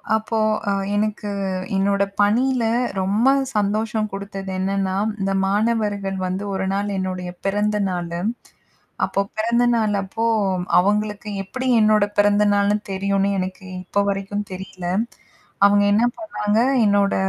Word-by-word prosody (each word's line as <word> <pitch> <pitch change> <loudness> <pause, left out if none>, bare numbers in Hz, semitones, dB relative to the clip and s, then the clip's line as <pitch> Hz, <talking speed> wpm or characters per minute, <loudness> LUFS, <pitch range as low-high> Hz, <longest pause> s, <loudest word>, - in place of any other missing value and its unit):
அப்போ, 220 +1 -2 0.3
ஆ, - - +2 0.2
எனக்கு 210 0 -1 0.5
என்னோட 200 0 +2 0.2
பணியில 245 +4 +2 0.4
ரொம்ப 205 +6 +1 0.3
சந்தோஷம் 215 +1 0
குடுத்தது 195 0 -6
என்னன்னா, 190 0 -1 0.2
இந்த 195 0 0
மாணவர்கள் 205 -2 0
வந்து 185 +2 -3
1 190 0 -1
நாள், 200 +1 -1
என்னுடைய 185 -1 -3 0.2
பிறந்த 210 +2 +1
நாளு. 175 -1 -3 0.9
அப்ப 195 - -1
பிறந்தநாள் 230 -1 +2
அப்போ, 210 +4 -4 0.6
அவங்களுக்கு 210 +2 0
எப்படி 260 +7 -4
என்னோட 215 -1 +4
பிறந்த 205 0 +4
நாள்னு 205 +1 +2
தெரியும்னு 195 +1 0
எனக்கு 185 +1 -5 0.2
இப்போ 200 - -1
வரைக்கும் 200 +1 -3
தெரியல. 185 -1 -8 0.8
அவங்க 205 0 +5
என்ன 220 - +3 0.2
பண்ணாங்க 215 -10 -1 0.3
என்னோட 200 -1 +3
205 Hz, 120 wpm, -21 LUFS, 195-215 Hz, 0.9 s, அவங்க